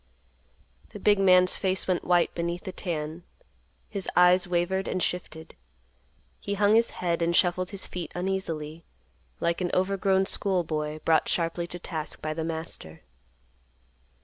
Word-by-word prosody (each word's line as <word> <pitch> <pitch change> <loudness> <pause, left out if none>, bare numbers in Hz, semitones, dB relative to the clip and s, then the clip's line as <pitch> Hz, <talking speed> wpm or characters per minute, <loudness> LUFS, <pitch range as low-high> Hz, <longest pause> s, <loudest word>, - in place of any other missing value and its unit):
The - - -7
big 205 -1 +4
man's 185 -1 +5
face 190 -1 0
went 185 -2 0
white 175 -1 +2
beneath 170 +1 -3
the 190 - -5
tan, 160 -3 -4 0.7
his 200 -3 -4
eyes 180 +1 +5
wavered 180 +2 0
and - - -1
shifted, 160 -2 -4 0.8
he 200 - -3
hung 205 +1 +4
his 230 +1 +4 0.2
head 170 -1 +1
and 170 +1 +1
shuffled 180 0 +2
his 200 -2 -3
feet 175 -2 -6
uneasily, 170 -4 -3 0.6
like 170 +2 0
an 180 - 0
overgrown 190 0 +2
school 190 -2 0
boy 155 -1 -3
brought 160 -1 +3
sharply 170 0 -1
to 175 - -6
task 160 -3 -5
by 155 0 -3
the 160 +1 -3
master. 160 - -5
175 Hz, 145 wpm, -27 LUFS, 165-190 Hz, 0.8 s, man's